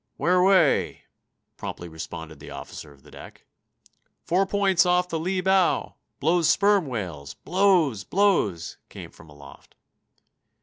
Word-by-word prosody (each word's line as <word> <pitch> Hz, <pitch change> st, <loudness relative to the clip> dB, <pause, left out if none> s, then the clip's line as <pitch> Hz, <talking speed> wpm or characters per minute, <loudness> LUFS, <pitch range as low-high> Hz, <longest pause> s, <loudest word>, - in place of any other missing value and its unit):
"Where 175 Hz, +5 st, +2 dB
away?" 180 Hz, -5 st, +2 dB, 0.5 s
promptly 85 Hz, -, -7 dB
responded 80 Hz, 0 st, -9 dB
the -, -, -11 dB
officer 75 Hz, -, -9 dB
of 70 Hz, -2 st, -21 dB
the -, -, -18 dB
deck. -, -, -14 dB, 0.8 s
"Four 190 Hz, +3 st, +1 dB
points 195 Hz, -3 st, +2 dB
off 180 Hz, 0 st, +1 dB
the 165 Hz, -, -3 dB
lee 185 Hz, +3 st, -2 dB
bow! 190 Hz, -1 st, +1 dB, 0.3 s
Blows 165 Hz, +1 st, +2 dB
sperm 200 Hz, -2 st, +3 dB
whales! 90 Hz, -, -6 dB
Blows! 175 Hz, -, +1 dB
Blows!" 180 Hz, -, 0 dB
came -, -, -10 dB
from 80 Hz, -, -17 dB
aloft. 70 Hz, -2 st, -16 dB
170 Hz, 130 wpm, -24 LUFS, -, 0.8 s, sperm